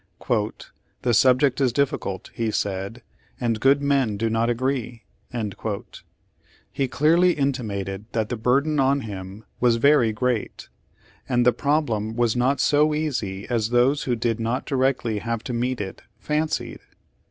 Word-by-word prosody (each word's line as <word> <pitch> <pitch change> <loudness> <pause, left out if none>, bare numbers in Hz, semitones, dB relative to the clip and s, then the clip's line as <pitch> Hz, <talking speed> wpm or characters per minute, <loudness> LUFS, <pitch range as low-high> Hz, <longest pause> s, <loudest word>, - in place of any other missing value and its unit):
"The 120 - +2
subject 130 +4 +4
is 130 -2 +3
difficult," 120 -7 -2
he 115 -2 -1
said, 100 +3 -3 0.4
"and 115 -3 0
good 135 +4 +3
men 135 -7 +1
do 115 +1 -1
not 115 +1 +1
agree." 120 -1 -2 1.7
He 135 - -1
clearly 170 +7 +3
intimated 105 -8 -2
that 110 -2 -1
the 125 - -2
burden 140 +7 +1
on 135 +1 +3
him 100 -1 -8
was 120 -2 +4
very 120 -1 +4
great, 120 0 -2 0.6
and 120 -1 +2
the 125 - +5
problem 120 -6 0
was 120 -1 +1
not 130 +3 +1
so 150 +1 +3
easy 115 -11 -3
as 115 -3 0
those 125 +4 +2
who 125 - +1
did 115 0 -1
not 115 +4 -2
directly 130 -5 0
have 115 +1 -3
to 125 - -4
meet 125 +2 -1
it 95 -2 -6 0.2
fancied. 150 +6 -2
120 Hz, 140 wpm, -24 LUFS, 110-135 Hz, 1.7 s, the